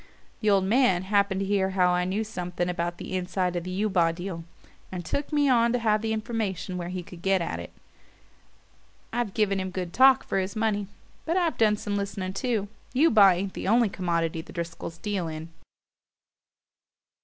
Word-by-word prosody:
The 215 - +1
old 195 -2 +4
man 195 -3 +3
happened 200 0 +1
to - - 0
hear 195 -1 +1
I 180 -1 +2
knew 195 +4 -1
something 180 -5 -3
about 175 -1 -2
the 185 - -5
inside 180 0 -1
of 175 - -2
the 180 - -6
Eubaw 180 -6 +3
deal, 175 -1 -5 0.5
and 180 -2 -5
took 285 - -3
me 290 -1 +3
on 235 -2 +4
to - - +3
have 215 -3 +1
the 220 0 -2
information 215 -5 -3
where 175 -1 -4
he 180 0 -4
could 175 -1 -12
get 195 +1 +2
at 165 - -3
it. 85 - -8 1.4
I've 235 -4 -2
given 200 -3 +2
him 185 0 -3
good 180 -2 -5
talk 265 +1 +6
for - - -1
his 190 +3 -3
money; 215 -2 0 0.4
but 335 +3 0
I've 340 -4 +1
done 210 -2 +4
some 205 0 -3
listening 195 -2 -3
too. 220 -2 -1 0.3
Eubaw 220 - +6
ain't 190 +2 -3
the - - -5
only 230 +1 +4
commodity 170 -3 -1
the - - -13
Driscolls 170 -1 -5
deal 200 -5 -2
in." 160 +1 -6
195 Hz, 185 wpm, -26 LUFS, 180-215 Hz, 1.4 s, talk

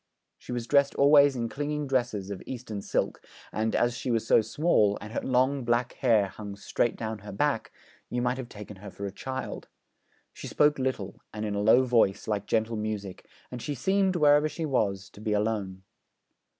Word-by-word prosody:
She - - -10
was 120 -1 -3
dressed 140 +2 +3
always 140 0 +6
in 120 -2 -1
clinging 150 +3 -3
dresses 120 -7 -1
of 100 - -6
Eastern 115 -5 -5
silk, - - -1 0.3
and, 110 +1 -1
as 120 0 +2
she 125 - -4
was 115 -2 +1
so 115 - +5
small, 110 -6 +2
and 105 +2 -9
her - - -1
long 130 +1 +1
black 120 +1 0
hair 110 -7 +2
hung 100 0 -8
straight 105 +3 -1
down 110 -1 -4
her 105 +1 -9
back, 140 +3 0 0.4
you 125 - -2
might 125 +1 0
have 125 -2 -6
taken 105 -1 -10
her 100 +2 -9
for 100 +1 -7
a 100 - -4
child. 130 +6 -6 0.7
She - - -8
spoke 150 -1 +3
little, 125 -7 -3
and 105 0 -4
in 105 - -2
a 100 - -1
low 110 +5 +6
voice, 115 -6 +2
like 105 -1 -2
gentle 110 0 0
music; 105 -3 -5 0.2
and 125 -1 -6
she 145 - -3
seemed, 190 +6 +1
wherever 150 -1 +5
she 165 +1 -4
was, 100 -9 0
to 105 - -14
be 110 -1 -1
alone. 105 -3 -1
115 Hz, 195 wpm, -28 LUFS, 105-135 Hz, 0.7 s, always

